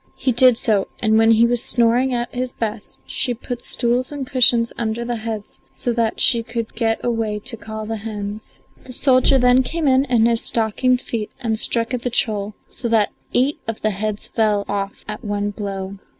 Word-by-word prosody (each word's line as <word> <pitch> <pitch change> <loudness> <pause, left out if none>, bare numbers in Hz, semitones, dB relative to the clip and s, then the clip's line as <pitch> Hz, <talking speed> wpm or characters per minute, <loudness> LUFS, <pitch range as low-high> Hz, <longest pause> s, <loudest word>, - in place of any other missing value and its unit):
He 260 - 0
did 250 0 +6
so, 210 -5 +1
and 220 -1 +2
when 225 0 +4
he 225 +1 +5
was 240 0 +1
snoring 240 +2 +3
at 240 -1 -3
his 250 0 -3
best 215 -2 -5
she 245 -3 0
put 240 +1 -6
stools 245 +3 +2
and 285 -2 -5
cushions 245 -3 +3
under 230 +1 -3
the 240 0 -2
heads 220 -2 -5
so 240 - -2
that 230 -1 -1
she 235 - +4
could 230 -1 -5
get 225 -2 0
away 225 -3 -1
to 240 +2 -4
call 220 -1 -7
the 225 +1 -4
hens. 210 0 -7 0.3
The 255 - -6
soldier 260 +1 +4
then 250 0 +4
came 315 +4 -2
in 265 0 +4
in 240 -4 +2
his 230 -1 +1
stockinged 245 +3 +1
feet 220 -3 -4
and 225 -3 -1
struck 230 +1 0
at 250 - -2
the 245 - -2
troll, 210 -3 0
so 235 - -4
that 220 -2 +2 0.2
eight 265 +4 +2
of 225 -1 -4
the 215 - +2
heads 210 +1 -2
fell 210 -2 0
off 200 -1 -4
at 210 0 -6
one 205 -1 -2
blow. 195 -1 -6
230 Hz, 200 wpm, -20 LUFS, 215-245 Hz, 0.3 s, did